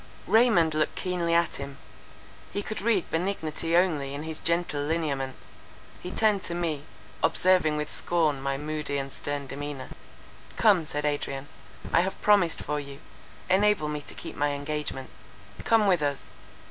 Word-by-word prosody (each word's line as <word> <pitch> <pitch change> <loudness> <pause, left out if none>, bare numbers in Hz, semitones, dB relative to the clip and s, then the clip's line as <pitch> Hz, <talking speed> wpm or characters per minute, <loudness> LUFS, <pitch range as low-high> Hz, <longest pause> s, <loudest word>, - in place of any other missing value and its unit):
Raymond 215 -7 +4
looked 155 0 +1
keenly 175 -2 0
at 170 -1 +2
him; 140 0 -7 0.7
he 205 - -2
could 215 - -4
read 210 -4 +1
benignity 165 -2 0
only 150 -7 +1
in 145 - -5
his 160 -1 -5
gentle 170 -3 0
lineaments; 145 -4 -1 0.6
he 180 - -5
turned 210 0 +2
to 170 - -4
me, 160 -4 -2 0.4
observing 180 -5 +3
with 150 0 -3
scorn 155 -5 +1
my 135 0 -1
moody 150 -1 -3
and 135 -1 -4
stern 145 -1 -3
demeanour. 140 0 -6 0.7
"Come," 195 -8 +4
said 150 0 -3
Adrian, 145 -1 -2 0.4
"I 170 - +6
have 190 +2 -3
promised 200 -5 +3
for 150 0 -1
you, 140 -1 -8 0.5
enable 190 -4 +3
me 150 -1 -3
to - - -11
keep - - -8
my 145 0 +1
engagement. 145 -2 -3 0.5
Come 225 -2 +4
with 180 -5 +3
us." 145 -2 -1
155 Hz, 155 wpm, -27 LUFS, 145-180 Hz, 0.7 s, I